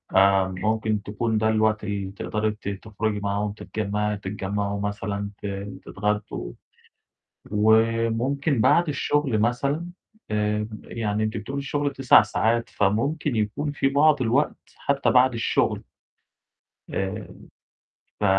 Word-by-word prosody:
آآ، 95 0 +5
ممكن 110 +1 0
تكون 110 +2 -1
ده 110 0 +2
الوقت 110 -1 +2
اللي 100 -2 -3
تقدري 110 +2 -2
أنتِ 105 -1 -3
تخرُجي 105 +1 -3
معاهم 100 +1 -1
تتجمّعي 105 0 -2
تتجمّعوا 100 0 -3
مثلًا 100 0 -3
ت - - -4 0.4
تتغدّوا. 105 - -3 1.0
وممكن 115 +5 +2
بعد 170 +9 +4
الشُغل 145 -4 +1
مثلًا 140 +8 0 0.4
آآ، 105 0 0 0.2
يعني 110 -1 -2
أنتِ 110 - -2
بتقولي 120 +7 -4
الشُغل 145 +1 -1
9 135 -2 +6
ساعات، 115 +3 0
فممكن 120 +7 0
يكون 110 +8 -1
فيه 135 -1 0
بعض 145 -1 +4
الوقت 125 +5 +1 0.2
حتّى 140 0 +1
بعد 125 0 +5
الشُغل. 115 - +1 1.1
آآ، 95 +1 -2 0.9
ف - - 0
110 Hz, 115 wpm, -25 LUFS, 105-125 Hz, 1.1 s, 9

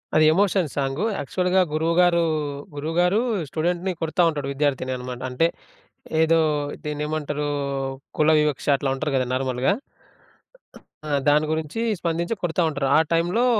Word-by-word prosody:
అది 155 - +6
emotion 190 -2 +2
song, 140 +7 -1
యాక్చువల్‌గా 180 +6 +1
గురువుగారూ, 170 +2 +3 0.5
గురువుగారూ 175 +7 +1 0.3
స్టూడెంట్‌ని 175 +4 -1
కొడతా 165 +2 0
ఉంటాడు, 145 -3 -3
విద్యార్థిని 135 -2 0
అనమాట. 125 0 -7
అంటే 125 +6 +2 0.8
ఏదో 165 0 +4 0.4
దీన్నేమంటరూ, 150 0 -2 0.7
కుల 155 0 +4
వివక్ష 150 -3 -1
అట్లా 135 -1 -2
ఉంటరు 140 +1 -2
గదా 130 -1 +1
నార్మల్‌గా. 130 +6 +1 1.4
ఆ - - -2 0.2
దాని 150 +1 +4
గురించీ, 160 +7 -2 0.2
స్పందించి 170 +5 -1
కొడతా 175 0 0
ఉంటారు. 140 -3 -2
ఆ - - +6
టైంలో 175 +9 +2
155 Hz, 125 wpm, -23 LUFS, 145-175 Hz, 1.4 s, అది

